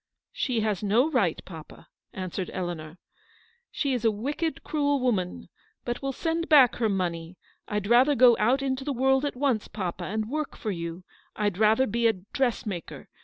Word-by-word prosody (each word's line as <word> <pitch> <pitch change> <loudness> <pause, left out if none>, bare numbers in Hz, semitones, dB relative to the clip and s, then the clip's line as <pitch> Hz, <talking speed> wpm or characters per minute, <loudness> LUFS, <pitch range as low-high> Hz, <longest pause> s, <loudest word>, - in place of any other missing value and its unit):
" - - -66
She 255 - -1
has 210 -3 -1
no 230 +9 +2
right, 200 - +1
papa," 160 -4 -12 0.2
answered 185 0 -4
Eleanor. 175 -3 -5 0.4
" - - -30 0.3
She 280 -3 -1
is 245 -3 -2
a 225 - +5
wicked, 285 +10 -3
cruel 285 -2 0
woman. 210 -8 -1 0.4
But 240 0 -3
we'll 275 0 -2
send 330 +4 -2
back 275 -6 +6
her 225 -3 +1
money. 175 -3 -3 0.3
I'd 210 -1 -2
rather 250 +6 +5
go 245 -1 +7
out 255 +6 +2
into 265 0 -1
the 285 0 -2
world 265 +2 +2
at 285 - -3
once, 250 -5 0
papa, 185 -3 -4
and 215 +3 -2
work 305 +4 -4
for 215 - -3
you: 170 0 -5 0.3
I'd 205 -3 -1
rather 220 +4 +4
be 235 0 +1
a 225 - +3
dressmaker. 210 - -4
225 Hz, 180 wpm, -27 LUFS, 190-265 Hz, 0.4 s, go